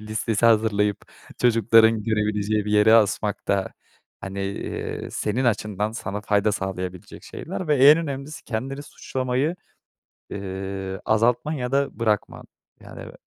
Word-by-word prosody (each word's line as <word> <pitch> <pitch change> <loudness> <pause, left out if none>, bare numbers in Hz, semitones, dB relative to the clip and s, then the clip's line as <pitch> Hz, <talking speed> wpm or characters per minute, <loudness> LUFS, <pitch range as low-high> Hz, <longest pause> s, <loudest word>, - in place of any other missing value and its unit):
listesi 110 +1 0
hazırlayıp 105 -2 +2 0.4
çocukların 115 -2 +4
görebileceği 105 -1 0
bir 105 - -2
yere 105 +2 +6
asmak 105 -1 +1
da, 100 -1 0 0.5
hani, 95 +1 -6 0.6
ııı, - - -7
senin 120 +5 -1
açından 105 -2 -1
sana 105 -2 -5
fayda 105 0 +1
sağlayabilecek 90 -2 -5
şeyler 185 0 -6
ve 150 - +3
en 155 - +6
önemlisi 145 -1 -6
kendini 135 +5 -4
suçlamayı, 130 +3 -2 0.8
ııı, 95 -1 -5
azaltman 120 +7 +2
ya 130 -4 -3
da 140 -2 0
bırakman, 110 -3 -1 0.4
yani. - - -10
110 Hz, 120 wpm, -23 LUFS, 100-125 Hz, 0.8 s, yere